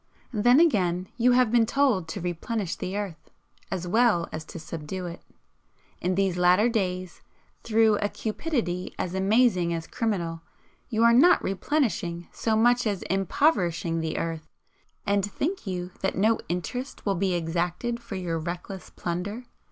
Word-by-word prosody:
Then, 240 +5 +5
again, 185 - +2
you 245 +1 +4
have 250 -3 +4
been 235 -2 +4
told 245 -11 +2
to 180 - -5
'Replenish 180 +3 -3
the 190 +2 -4
earth' 195 -6 -6 0.4
as 180 -2 -3
well 215 -4 +3
as 155 - -5
to - - -9
subdue 165 +3 -6
it. 170 -1 -7 0.8
In 180 +1 0
these 190 -2 +1
latter 180 +6 +5
days, 185 -5 -2 0.4
through 220 -1 +3
a 205 - -1
cupidity 215 - -3
as 180 - -3
amazing 190 -3 +3
as 165 -1 -5
criminal, 170 -8 -2 0.5
you 225 -2 +1
are 235 0 +6
not 345 +9 +6
'replenishing' 190 - -1
so 220 -1 0
much 240 +1 +3
as 200 -3 -2
impoverishing 180 - +1
the 160 0 -2
earth, 165 -1 -3 0.6
and 200 -1 +2
think 280 - -3
you 180 -1 -3
that 190 - -1
no 220 +4 +3
interest 245 +10 -4
will 200 - +2
be 190 0 0
exacted 175 +8 -2
for 235 -4 -8
your 175 -3 -2
reckless 180 +3 -6
plunder? 195 +8 -4
190 Hz, 150 wpm, -26 LUFS, 175-230 Hz, 0.8 s, are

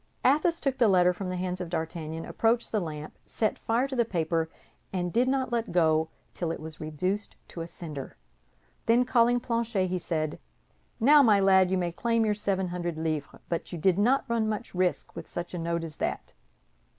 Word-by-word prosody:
Athos 310 +5 +3
took 265 -2 -1
the 235 - +5
letter 180 -2 +5
from 185 +1 -5
the 185 - -2
hands 180 0 -3
of 175 - -4
D'Artagnan, 160 -1 -4
approached 230 +1 +1
the 215 - +1
lamp, 155 -4 -6
set 215 - -1
fire 235 +4 +1
to 270 - -5
the 240 - +3
paper, 165 -5 -1 0.4
and 180 -2 -2
did 245 +3 +3
not 260 -1 0
let 235 -1 -1
go 160 -2 +3 0.2
till 170 - -3
it - - -4
was 155 0 -9
reduced 185 +7 -2
to 170 - -7
a 165 - -5
cinder. 150 -6 -8 0.7
Then, 240 +2 +4
calling 245 -1 +4
Planchet, 230 -5 0
he 185 0 -1
said, 155 -3 -2 0.6
"Now, 290 +6 +7
my 215 -6 +5
lad, 190 -1 +5
you 190 - +1
may 175 -1 -1
claim 230 +5 +1
your 210 - +2
seven 195 -3 -1
hundred 175 -2 -3
livres, 155 -2 -3
but 170 - -3
you 175 - -4
did 185 +3 +2
not 250 +6 +3
run 230 -2 +1
much 215 -1 -4
risk 180 -1 -1
with - - -8
such 175 +1 -5
a 175 - -3
note 170 0 -1
as 160 -2 -7
that." - - -3
185 Hz, 200 wpm, -28 LUFS, 165-230 Hz, 0.7 s, Now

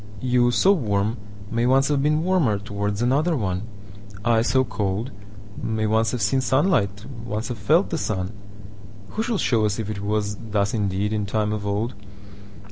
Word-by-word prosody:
You, 125 0 +3
so 185 +10 +4
warm, 110 - 0 0.3
may 115 +1 +1
once 135 +2 +4
have 145 -2 +2
beenWarmer 150 - +2
towards 105 +1 -2
another 150 +6 +2
one:I, 100 +2 -3
so 130 +3 +3
cold, 105 +1 -2 0.5
may 110 -1 -1
once 110 +1 +2
have 125 -1 -2
seenSunlight, 130 - +1 0.2
once 110 +1 -3
have 120 -3 -5
felt 160 - +3
the 165 - -1
sun:Who 100 - -6
shall 230 -1 0
show 115 - +2
us 105 -1 +1
if 110 -2 -3
it 105 - -5
wasThus 105 0 -1
indeed 100 -1 0
in 105 -2 -1
time 105 +1 0
of 105 -1 -4
old? 105 +4 -1
110 Hz, 150 wpm, -23 LUFS, 100-125 Hz, 0.5 s, so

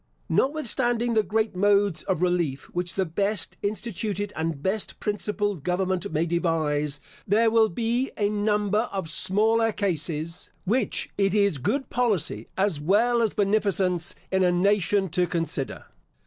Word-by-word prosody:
Notwithstanding 245 -4 +1
the 220 - +4
great 215 -1 -1
modes 200 -3 +3
of 185 -3 -1
relief 170 -7 0
which 175 0 -3
the 190 - +1
best 200 +5 -1
instituted 205 -1 -3
and 160 -2 -3
best 200 +2 -2
principled 205 -4 -2
government 185 +2 -1
may 155 +2 +1
devise, 155 -4 0 0.3
there 220 +3 +3
will 225 -1 +4
be 235 +7 -1
a 205 - +2
number 210 +1 +1
of 190 -5 -3
smaller 220 +6 +2
cases, 165 -4 -2 0.2
which 240 +7 0
it 195 0 +2
is 200 -8 +2
good 265 - -1
policy 200 - 0
as 190 -6 +1
well 230 +9 +3
as 225 -3 0
beneficence 195 -3 +1 0.2
in 190 0 +2
a 180 - +4
nation 200 +1 +2
to 180 +2 +1
consider. 165 -6 -3
200 Hz, 140 wpm, -25 LUFS, 175-215 Hz, 0.3 s, the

